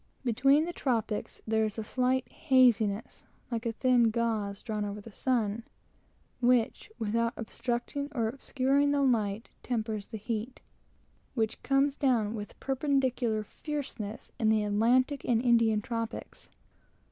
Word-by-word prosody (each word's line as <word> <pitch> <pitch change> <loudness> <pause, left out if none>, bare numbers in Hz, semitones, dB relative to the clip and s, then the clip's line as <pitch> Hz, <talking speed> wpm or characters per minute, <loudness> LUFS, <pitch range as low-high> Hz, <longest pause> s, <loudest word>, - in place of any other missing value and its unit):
Between 275 +6 +4
the 345 - -4
tropics 230 -8 -2
there 220 0 +2
is 215 0 -2
a 220 - -2
slight 255 +3 0
haziness, 235 -6 +2 0.3
like 230 0 -2
a - - +1
thin 240 0 +3
gauze, 220 -3 -1
drawn 215 -3 -2
over 205 0 -4
the 220 +2 -11
sun, 225 -2 0 0.8
which, 245 - +2
without 230 +2 0
obstructing 240 +5 -3
or 230 -5 0
obscuring 275 +3 +1
the 285 -1 +2
light, 220 -4 +1
tempers 220 -4 -2
the 220 - -6
heat 230 +3 -4 0.8
which 220 -3 -1
comes 275 +1 +2
down 235 -7 +1
with 210 -2 -7
perpendicular 260 -5 0
fierceness 255 -5 -6
in 220 - +3
the 215 -1 +3
Atlantic 245 +7 +2
and 235 -2 +2
Indian 230 -3 +3
tropics. 230 -1 -5
230 Hz, 135 wpm, -30 LUFS, 220-260 Hz, 0.8 s, Between